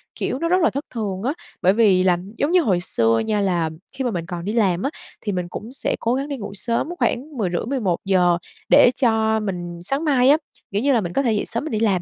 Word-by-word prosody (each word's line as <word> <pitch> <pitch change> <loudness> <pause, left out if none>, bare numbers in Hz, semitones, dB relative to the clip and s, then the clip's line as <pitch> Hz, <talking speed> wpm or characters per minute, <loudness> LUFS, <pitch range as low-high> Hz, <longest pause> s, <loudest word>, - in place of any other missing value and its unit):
kiểu, 260 - -2
nó 335 - 0
rất 365 +1 +3
là 325 - +4
thất 280 +3 -4
thường 205 -4 -4
á, 270 - 0 0.3
bởi 185 +2 +4
vì 200 -5 +4
là 180 -2 +3 0.2
giống 290 - 0
như 360 -1 +5
hồi 190 - +1
xưa 115 -8 +2
nha 210 -1 0
là 175 -4 +1 0.2
khi 265 0 -4
mà 245 - 0
mình 170 -3 -3
còn 175 -1 -6
đi 210 - -2
làm 190 -6 +1
á 275 - +1 0.3
thì 205 - -2
mình 180 -2 -2
cũng 220 +5 -7
sẽ 270 - 0
cố 230 - 0
gắng 275 +2 -2
đi 280 -2 -4
ngủ 205 -3 -6
sớm 235 +8 -1
khoảng 275 +2 -1
10:30-11:00 185 -3 +1 0.3
để - - +7
cho 220 -2 +2
mình 175 -4 -4
sáng 275 - -2
mai 265 -3 +4
á, 300 - +6 0.3
kiểu 200 +2 0
như 280 0 +3
là, 230 - +3
mình 175 -3 -5
có 275 - +2
thể 240 -5 +1
dậy 210 - -1
sớm 230 - -3
mình 315 - -5
đi 215 - -1
làm. 200 -5 +2
215 Hz, 255 wpm, -22 LUFS, 185-260 Hz, 0.3 s, để